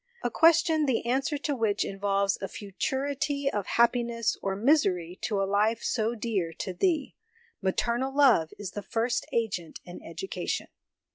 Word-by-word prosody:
A - - 0
question 325 -2 +4
the 250 -3 0
answer 275 +5 0
to 290 0 -2
which 220 -4 0
involves 195 0 0
a 195 - -2
futurity 275 - -2
of 205 -2 -3
happiness 235 -1 +2
or 195 -1 -1
misery 195 - +2
to 210 -4 -1
a - - +1
life 210 +4 +1
so 225 0 0
dear 205 -7 -2
to 185 +3 -5
thee. 310 - 0 0.5
Maternal 235 +7 0
love 265 - +4
is 205 -3 -6
the 205 - -5
first 230 +4 -1
agent 210 -8 -2
in 175 - -10
education." 175 +2 -4
225 Hz, 150 wpm, -28 LUFS, 195-270 Hz, 0.5 s, question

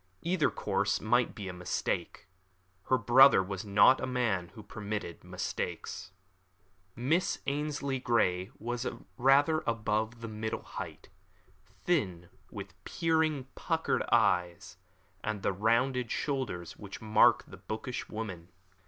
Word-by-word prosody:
Either 170 -2 +2
course 100 0 0
might 120 +3 +1
be 100 -3 -6
a 90 - -5
mistake. 90 -1 -3 0.6
Her 130 - +4
brother 125 -1 +7
was 95 0 -5
not 105 +5 +5
a 130 - -2
man 115 -8 0
who 110 - -10
permitted 100 -4 -5
mistakes. 95 0 -5 0.8
Miss 155 +10 +1
Ainslie 140 -1 -2
Grey 95 -7 +1
was 120 +3 -3 0.3
rather 140 +5 +4
above 110 0 -1
the 115 - -5
middle 110 0 -4
height, - - -8 0.8
thin, 95 - 0 0.2
with 100 -3 -8
peering, 160 -4 +1
puckered - - 0
eyes, 90 -1 +2 0.5
and 110 -2 -3
the 100 - +1
rounded 115 +5 +1
shoulders 120 - -3
which 100 -2 -9
mark 110 0 +4
the - - -12
bookish 110 +3 -5
woman. 95 -6 -6
110 Hz, 120 wpm, -31 LUFS, 100-130 Hz, 0.8 s, brother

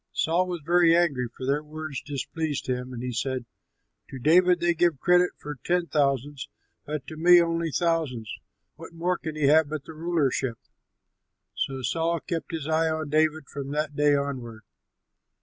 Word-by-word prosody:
Saul 175 +3 +1
was 175 -2 -4
very 170 0 +5
angry, 140 -8 +1
for 130 - -5
their 140 +3 +1
words 155 -2 -6
displeased 145 +1 -4
him, 125 0 -3
and 120 -1 -6
he 125 - -3
said, 130 +1 -2 0.6
"To 135 - -7
David 175 +6 +4
they 175 0 +2
give 170 -4 +1
credit 180 +3 +4
for 150 -2 -8
ten 175 0 +1
thousands, 140 -3 -1 0.4
but 150 -2 -4
to 155 - -9
me 175 +2 +7
only 165 -1 0
thousands; 155 -9 -1 0.4
what - - -11
more 175 +2 -1
can 160 -2 -5
he 155 - -3
have 150 +1 +5
but 155 -2 -4
the 160 - -9
rulership?" 155 -7 -1 1.0
So 135 -1 -3
Saul 165 +6 0
kept 165 0 -5
his 160 -3 -4
eye 160 0 +2
on 155 -2 -3
David 155 -1 +1
from 140 -1 -6
that 150 -1 -2
day 145 0 +4
onward. 125 -6 -4
155 Hz, 170 wpm, -26 LUFS, 140-165 Hz, 1.0 s, me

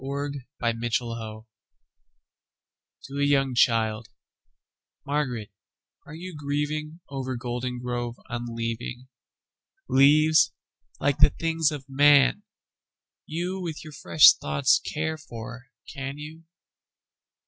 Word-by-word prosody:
Spring 140 -1 -4
and 115 0 -1
Fall 110 -1 -4 1.6
to 140 +1 -6
a - - +2
young 135 -2 +2
childMÁRGARÉT, 115 +2 -2 0.6
áre 150 - -9
you 180 0 -8
gríevingOver 145 -2 -4
Goldengrove 120 -1 -4
unleaving? 120 +1 -5 0.8
Leáves, 155 +3 +5 0.5
líke 145 -1 0
the - - +8
things 165 -2 0
of 145 -3 -6
man, 145 +5 +5 0.9
youWith 175 0 -4
your 155 -1 -10
fresh 85 - +7
thoughts 75 0 +2
care 160 +1 -3
for, 120 -4 -9 0.3
can 140 0 -5
you? 155 +2 -10
135 Hz, 90 wpm, -26 LUFS, 120-150 Hz, 1.6 s, the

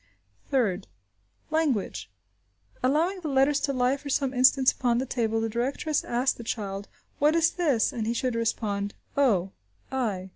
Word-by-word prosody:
Third. 210 -8 0 0.6
Language. 300 - 0 0.7
Allowing 320 +9 +1
the 335 - -5
letters 275 +1 +3
to 285 - -1
lie 255 +1 +1
for 285 0 -9
some 270 -1 0
instants 260 +1 +5
upon 240 -2 0
the 255 - 0
table, 225 -3 -1
the 225 - 0
directress 265 +6 -1
asks 245 +2 0
the 235 - -9
child, 200 -3 -4 0.3
"What 300 +2 +4
is 330 -1 +4
this?" 290 -11 +1
and 220 -2 -3
he 230 - +1
should 250 +1 -1
respond, 205 -3 -2 0.2
o, 200 -10 +2 0.4
i. 210 -8 -2
255 Hz, 155 wpm, -27 LUFS, 225-280 Hz, 0.7 s, instants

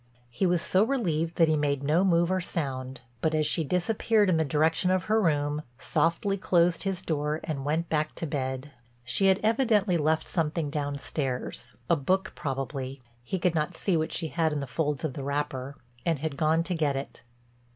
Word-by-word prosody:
He 155 +11 +1
was 175 -1 +2
so 190 +2 +3
relieved 170 - 0
that 165 - +5
he 155 - +3
made 145 -2 0
no 155 +6 +3
move 170 -2 +3
or 185 0 +1
sound, 130 -7 -4 0.2
but, 160 0 +1
as 155 0 +2
she 165 - +2
disappeared 205 +5 +2
in 165 - +3
the 160 - +3
direction 155 +4 +2
of 185 0 +2
her 220 +1 +2
room, 150 -4 +1 0.2
softly 170 - 0
closed 175 -2 +2
his 190 -2 -2
door 150 -1 -1
and 140 -4 -4
went 160 +3 0
back 155 -1 -1
to - - -3
bed. 130 -1 -3 0.3
She 125 +11 +2
had 190 0 +4
evidently 215 -5 +3
left 155 0 +1
something 155 -2 -1
downstairs, 140 -4 -3
a 170 - +4
book 185 +6 0
probably—he 130 -1 -5
could 180 -1 +1
not 160 +2 -1
see 190 - +1
what 160 0 0
she 165 -2 -1
had 160 -1 +1
in 150 - -1
the 140 - -3
folds 145 0 -2
of 155 -4 -2
the 140 - -6
wrapper—and 140 0 -3
had 150 0 -3
gone 160 +3 +2
to 180 - -2
get 150 -4 +1
it. 135 +1 -6
155 Hz, 190 wpm, -28 LUFS, 140-175 Hz, 0.3 s, that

